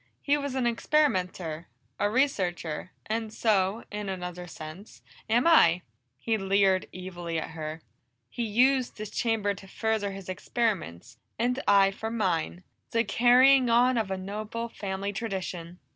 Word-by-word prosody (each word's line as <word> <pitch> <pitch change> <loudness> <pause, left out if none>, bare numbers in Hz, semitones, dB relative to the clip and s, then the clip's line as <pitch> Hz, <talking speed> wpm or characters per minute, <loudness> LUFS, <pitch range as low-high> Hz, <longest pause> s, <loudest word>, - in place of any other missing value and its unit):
He 285 - +3
was 285 -2 -3
an 260 -2 0
experimenter, 185 - 0 0.3
a 205 - +2
researcher, 185 - -1 0.2
and 220 0 -2
so, 210 -1 +1
in 205 -1 -4
another 180 -1 -5
sense, 165 +5 -10 0.3
am 235 +3 +3
I!" 180 - +5 0.3
He 220 - -1
leered 195 -1 +2
evilly 175 -2 -5
at 160 - -4
her. 160 0 -6 0.4
"He 240 - -6
used 250 +4 +2
this 215 -1 -6
chamber 220 -3 0
to 195 -1 -12
further 220 0 -1
his 195 -1 -9
experiments, 180 - -3 0.2
and 250 +3 0
I 195 -1 +6
for 220 +3 -5
mine 185 -5 -1 0.3
the 230 0 +2
carrying 250 +2 +5
on 245 +2 +4
of 220 -4 0
a 190 - -2
noble 215 +4 -5
family 200 -1 -4
tradition!" 185 -5 -5
200 Hz, 145 wpm, -28 LUFS, 180-230 Hz, 0.4 s, I